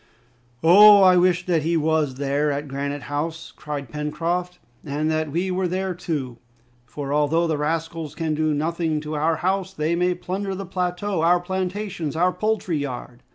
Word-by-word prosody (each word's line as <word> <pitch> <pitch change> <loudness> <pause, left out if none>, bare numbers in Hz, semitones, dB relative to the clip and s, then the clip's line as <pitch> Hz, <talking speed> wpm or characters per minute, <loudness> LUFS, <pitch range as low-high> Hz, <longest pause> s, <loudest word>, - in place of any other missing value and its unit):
"Oh! 200 +4 +8
I 185 -1 +7
wish 180 0 +3
that 170 -3 +1
he 165 +2 +1
was 155 -3 +1
there, 140 +2 0
at 145 +1 -3
Granite 140 +1 -4
House!" 160 +4 -4
cried 145 -3 -6
Pencroft, 170 +4 -2 0.3
"and 150 +2 -1
that 155 -1 -1
we 180 +5 -1
were 185 0 0
there, 185 +1 -2
too! 145 -9 -4 0.5
For, 140 +4 -5
although 150 +3 +2
the 155 -3 -1
rascals 160 0 -3
can 160 -2 -1
do 155 0 0
nothing 160 +1 -1
to 155 0 -6
our 155 +2 +1
house, 190 +2 -1
they 155 +1 0
may 180 +1 +1
plunder 190 +2 -4
the 195 +1 -5
plateau, 180 0 -2
our 175 +2 +4
plantations, 185 -3 -3
our 180 +3 +3
poultry 215 -6 -1
yard!" 125 -3 -6
165 Hz, 170 wpm, -23 LUFS, 150-180 Hz, 0.5 s, Oh